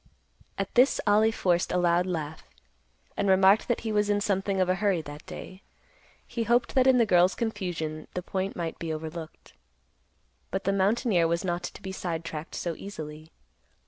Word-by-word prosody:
At 195 - -3
this 250 +3 +4
Ollie 215 +1 +5
forced 175 -5 +1
a - - +1
loud 175 0 +2
laugh, 160 -3 -4 0.7
and 200 - 0
remarked 190 +2 +5
that 240 - 0
he 225 - -3
was 210 -1 +1
in 205 0 +2
something 195 -1 0
of 185 - +3
a 185 - +3
hurry 195 -6 +2
that 145 +1 -9
day. 185 +1 -9 0.6
He 235 - -4
hoped 240 +2 +2
that 260 -1 +4
in 260 -1 +6
the 235 - +4
girl's 180 -2 +4
confusion 175 -9 -3
the 180 - -3
point 190 +1 -3
might 165 -2 -4
be 165 -1 -3
overlooked. 160 +1 -7 1.0
But 190 - -3
the 195 - +1
mountaineer 195 -2 +2
was 170 +2 -1
not 175 -1 -1
to - - -8
be 190 - -5
sidetracked 165 -3 -5
so 170 - -2
easily. 155 -5 -8
185 Hz, 175 wpm, -27 LUFS, 170-205 Hz, 1.0 s, in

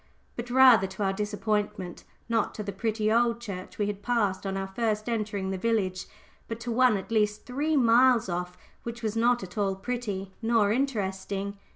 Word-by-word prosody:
But, 240 0 -5
rather 250 -6 +6
to 190 +2 -5
our 195 0 +1
disappointment, 210 -2 -2 0.2
not 225 -2 0
to 210 - -4
the 200 - -4
pretty 215 +2 -1
old 235 0 +2
church 195 -6 -7
we 205 - +1
had 205 -1 -4
passed 205 -5 0
on 195 0 -3
first 215 -1 -1
entering 210 -4 -2
the 190 - -3
village, 190 -4 0 0.4
but 225 0 -5
to 240 - -3
one 245 -2 +4
at 190 - -8
least 210 -1 +1
three 290 +5 0
miles 240 -1 +5
off, 180 0 -4 0.2
which 235 0 -7
was 215 -1 -1
not 240 0 +2
at 190 +3 -7
all 195 -1 +1
pretty 200 -3 -4
nor 225 -3 +3
interesting. 200 -5 -2
215 Hz, 180 wpm, -27 LUFS, 195-235 Hz, 0.4 s, rather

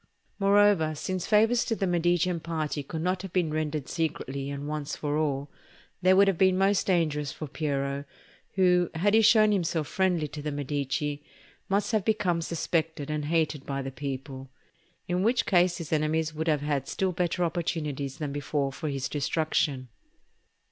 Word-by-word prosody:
Moreover, 200 -5 +4
since 185 +3 -3
favours 225 +3 +4
to 225 - 0
the 200 - -1
Medicean 175 0 +1
party 155 -2 -3
could 160 +3 -5
not 180 +1 0
have 195 -2 -7
been 170 -4 0
rendered 155 -3 -2
secretly 140 -4 -3
and 140 0 -5
once 150 -1 -3
for 145 -1 -2
all, 145 -2 -1 0.5
they 185 0 +5
would 195 +1 +6
have 190 -4 +1
been 185 -1 +4
most 195 +1 +2
dangerous 155 -6 +1
for 155 - -6
Piero, 140 -1 -2 0.5
who, 180 -2 +3
had 200 +6 +2
he 220 - +6
shown 215 -1 +6
himself 170 -5 0
friendly 180 -5 +1
to 150 - -7
the 150 +1 -3
Medici, 145 0 -2 0.5
must 200 +4 +1
have 215 -3 +1
become 200 -5 +1
suspected 160 -2 -2
and 150 -1 -2
hated 155 -2 0
by 140 -1 -2
the 135 - -5
people; 135 -1 -6 0.6
in 180 +1 0
which 235 +5 +2
case 175 -1 +3
his 165 -2 -5
enemies 155 +1 0
would 160 +1 -3
have 150 -3 +2
had 145 -2 -1
still 190 -1 -1
better 180 0 -1
opportunities 150 -5 -2
than 150 -3 -3
before 145 0 -1
for 155 +2 -4
his 135 -2 -2
destruction. 145 -3 -1
160 Hz, 170 wpm, -27 LUFS, 145-185 Hz, 0.6 s, would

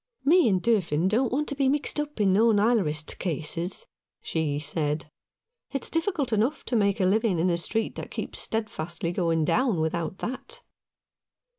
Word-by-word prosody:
"Me 335 -2 +5
and 185 -3 +1
Durfin 185 -8 +2
don't 230 +5 +1
want 295 +4 0
to - - -2
be 275 -1 +1
mixed 290 +1 -1
up 295 -4 -4
in 195 -3 +3
no 225 +4 +5
Nilerist 205 -9 +1
cases," 170 - -2 0.3
she 155 -3 -1
said. 150 0 -2 0.3
" 485 +1 -52
It's 275 - -2
difficult 330 - 0
enough 225 +8 0
to 245 - -1
make 200 -2 +2
a 190 - +3
living 210 0 +2
in 175 +2 +2
a 170 - +1
street 225 +6 -1
that - - -6
keeps - - -4
steadfastly 170 -6 -2
going 165 -3 +1
down, 235 - +2
without 165 +3 -2
that." 450 - -5
205 Hz, 170 wpm, -26 LUFS, 165-260 Hz, 0.3 s, Me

